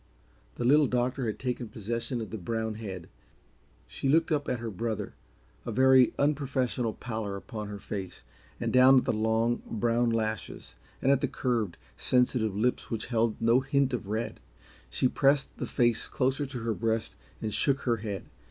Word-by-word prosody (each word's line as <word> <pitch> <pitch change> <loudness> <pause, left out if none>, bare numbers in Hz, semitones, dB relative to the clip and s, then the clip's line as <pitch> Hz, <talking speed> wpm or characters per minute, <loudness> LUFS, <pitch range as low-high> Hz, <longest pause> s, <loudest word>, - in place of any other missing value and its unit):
The - - -3
Little 145 +3 +5
Doctor 125 +1 0
had 110 - -2
taken 125 -2 -3
possession 115 +4 -3
of 110 - -6
the 110 - -4
brown 110 +3 -2
head. 95 -6 -7 0.8
She 135 - -3
looked 160 +3 +3
up 145 -2 0
at 125 - 0
her 115 -1 -5
brother, 110 +2 -3 0.5
a - - -4
very 130 -1 +6
unprofessional 135 -5 0
pallor 110 -4 -4
upon 105 +1 -6
her 105 0 -6
face, 95 -2 -6 0.4
and - - -2
down 130 +1 +7
at 125 - +3
the - - +1
long, 110 +2 +1
brown 115 +2 +1
lashes 110 - -3 0.3
and 135 - +4
at 140 -1 +3
the - - +1
curved, 115 -8 -1 0.2
sensitive 125 -5 +1
lips 120 +5 0
which 115 -1 -3
held 115 -1 +1
no 115 +2 +4
hint 135 0 +1
of 115 -5 -3
red. 110 +3 -3 0.5
She 130 - +2
pressed 140 +2 +2
the - - -3
face 120 -2 +1
closer 135 +2 0
to 130 -3 -6
her 115 0 0
breast 115 0 -1 0.2
and 110 -2 -3
shook 140 -1 +1
her 120 -2 +1
head. 105 -3 -5
115 Hz, 175 wpm, -29 LUFS, 110-130 Hz, 0.8 s, down